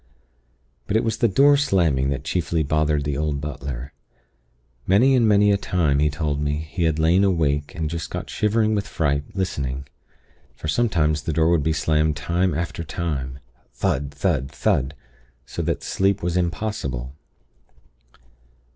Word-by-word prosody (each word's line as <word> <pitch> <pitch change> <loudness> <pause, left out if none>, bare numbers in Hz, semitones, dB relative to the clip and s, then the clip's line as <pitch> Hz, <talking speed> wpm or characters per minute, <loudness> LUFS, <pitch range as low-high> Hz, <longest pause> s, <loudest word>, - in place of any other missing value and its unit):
"But 100 - -1
it - - +1
was 110 -1 -1
the 115 - +3
door 140 +8 +5
slamming 85 - +2
that 70 -1 -3
chiefly 80 0 0
bothered 75 0 +1
the 75 -1 -2
old 75 0 -1
butler. 70 -2 -6 0.9
Many 120 +8 +5
and 120 -3 +4
many 105 -1 +5
a 100 - +3
time, 80 -8 +1
he 75 0 +3
told 75 -1 -2
me, 75 0 0
had 80 +1 -1
he 80 - 0
lain 90 +5 +4
awake 75 -6 0
and 80 -1 -2
just 85 +1 -4
got - - -5
shivering 110 +1 +1
with 100 -1 -1
fright, 75 -5 0
listening; 70 -8 -2 0.7
for 80 - -7
sometimes 80 -6 +1
the 80 - -3
door 80 +2 +3
would 85 -3 +3
be 80 +3 +1
slammed 75 0 +1
time 85 +2 0
after 85 +1 -3
time 75 -5 -3 0.4
thud! 70 +1 -1
thud! 70 -3 -1
thud! 70 0 0 0.5
so - - -5
that - - -2
sleep 100 0 0
was 85 0 -1
impossible. 85 - -2
80 Hz, 155 wpm, -23 LUFS, 70-95 Hz, 0.9 s, door